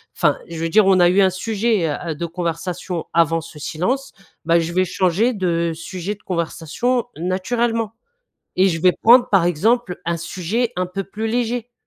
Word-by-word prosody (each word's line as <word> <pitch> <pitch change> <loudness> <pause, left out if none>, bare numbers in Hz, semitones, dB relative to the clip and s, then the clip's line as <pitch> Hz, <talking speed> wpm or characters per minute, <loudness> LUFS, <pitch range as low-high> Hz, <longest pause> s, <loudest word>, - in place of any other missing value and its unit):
enfin, - - +2
je 170 - -7
veux 165 - -1
dire 210 +4 +5
on 190 -1 +4
a 175 0 +6
eu 190 +3 +4
un 190 - +5
sujet, 205 -1 0
heu, 155 +2 -4
de 170 +3 -4
conversation 170 0 -4
avant 165 0 +3
ce 155 -1 -12
silence, 235 - -2 0.3
bah, 170 +1 +4
je 165 +1 -3
vais 185 +1 +2
changer 190 +7 +1
de 170 -4 0
sujet 180 +4 -5
de 205 - -28
conversation 180 +8 -1
naturellement. 225 +6 -1 0.6
Et 190 +1 +4
je 165 -3 -2
vais 180 +1 +5
prendre, 245 +6 +5
par 195 -4 +4
exemple, 185 +3 +1
un 170 0 -1
sujet 185 +8 -2
un 180 0 0
peu 190 +2 -4
plus 210 +3 -5
léger. 240 +1 -2
185 Hz, 180 wpm, -20 LUFS, 170-220 Hz, 0.6 s, a